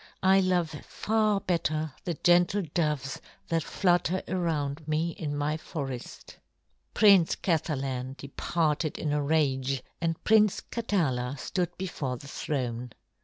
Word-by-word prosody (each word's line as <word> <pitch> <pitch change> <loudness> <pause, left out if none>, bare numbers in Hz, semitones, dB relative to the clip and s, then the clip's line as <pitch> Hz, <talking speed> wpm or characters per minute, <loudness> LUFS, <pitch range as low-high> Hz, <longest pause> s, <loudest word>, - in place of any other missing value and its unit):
I 190 +1 +6
love 180 -3 +1
far 215 -2 +1
better 155 -5 -1
the 175 - -1
gentle 175 +5 +3
doves 150 -5 -1 0.3
that 165 -1 +1
flutter 180 +2 +1
around 155 -5 -2
me 155 +2 0
in 150 -3 -4
my 150 +2 0
forest." 135 -6 -7 0.6
Prince 195 -6 +6
Kathalan 135 -6 -1
departed 150 +3 -1
in 150 -2 -1
a 150 - +1
rage, 135 -3 +1 0.2
and 165 -1 -1
Prince 215 -2 +4
Katala 145 - -1
stood 175 +5 -2
before 145 -9 -3
the 140 - -12
throne. 125 -5 -3
155 Hz, 120 wpm, -28 LUFS, 140-180 Hz, 0.6 s, I